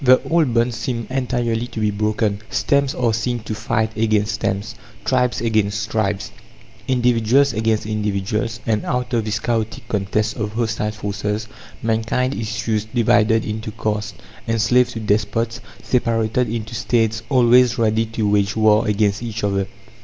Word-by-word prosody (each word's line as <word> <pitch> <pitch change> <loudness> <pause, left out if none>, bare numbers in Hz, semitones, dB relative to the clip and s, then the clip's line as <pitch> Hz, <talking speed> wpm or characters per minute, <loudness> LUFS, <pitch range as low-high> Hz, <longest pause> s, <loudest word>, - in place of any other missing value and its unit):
The 130 0 +6
old 160 -6 +2
bonds 120 0 +2
seem 115 -1 -3
entirely 120 -3 -1
to 115 - -7
be 105 -1 +1
broken. 105 0 0
Stems 140 -2 +1
are 120 -3 +1
seen 120 +2 -1
to 110 - -5
fight 110 0 -1
against 110 -1 +1
stems, 105 0 -2 0.3
tribes 125 -2 +1
against 110 -1 0
tribes, 105 -3 -1 0.6
individuals 125 +1 +3
against 110 -1 0
individuals; 105 +2 -2
and 110 -2 0
out 125 0 -2
of 115 -2 +1
this 105 -2 -1
chaotic 115 +2 -2
contest 105 0 -1
of 105 -1 -3
hostile 110 -2 -1
forces, 105 +1 -3 0.4
mankind 115 +4 0
issues 110 -2 -2
divided 115 -1 +2
into 110 0 -4
castes, 105 -1 -3 0.3
enslaved 115 +2 +3
to 115 - -4
despots, 110 +2 0 0.2
separated 115 -1 +1
into 110 0 -4
States 115 -1 0
always 125 -1 +5
ready 110 -1 +2
to 110 -1 -2
wage 100 0 +2
war 110 0 +4
against 105 0 +1
each 115 -2 -5
other. 100 -1 0
110 Hz, 145 wpm, -20 LUFS, 105-120 Hz, 0.6 s, The